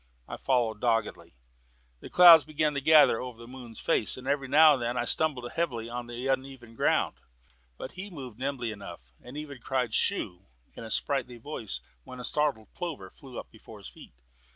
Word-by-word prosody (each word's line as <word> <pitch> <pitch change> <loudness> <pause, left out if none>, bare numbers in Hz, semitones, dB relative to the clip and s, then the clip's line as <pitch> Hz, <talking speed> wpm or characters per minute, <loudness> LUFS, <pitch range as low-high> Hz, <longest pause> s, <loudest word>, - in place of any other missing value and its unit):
I - - -6
followed 120 -5 0
doggedly. 115 - -1 0.7
Clouds 170 -3 +9
began 155 +1 -1
to 140 - -2
gather 155 -5 +5
over 125 -2 -7
the 115 0 -12
moon's 125 -3 -8
face, 110 - 0
and 130 - -10
every 140 -1 0
now 150 +3 +7
and 135 - -2
then 120 +1 -2
I 120 - 0
stumbled 130 -4 +1
heavily 120 -9 -2
on 120 0 -6
the 120 +2 -6
uneven 130 -3 -3
ground; - - +1 0.6
but 130 - -7
he 190 +3 -8
moved 130 - -10
along 140 +1 0
nimbly 120 -3 -4
enough, 100 - -9 0.2
and 125 +4 -10
even 145 -3 -7
cried 125 -3 -2
"Shoo!" 100 - -1 0.3
in - - -9
a 110 - -8
sprightly 125 0 -1
voice 110 - -6 0.2
when 125 - -11
a - - -7
startled 140 -5 -1
plover 150 - -6
flew 130 -3 -12
up - - -8
before 110 -1 -14
his 100 - -10
feet. - - -16
125 Hz, 190 wpm, -28 LUFS, 115-145 Hz, 0.7 s, Clouds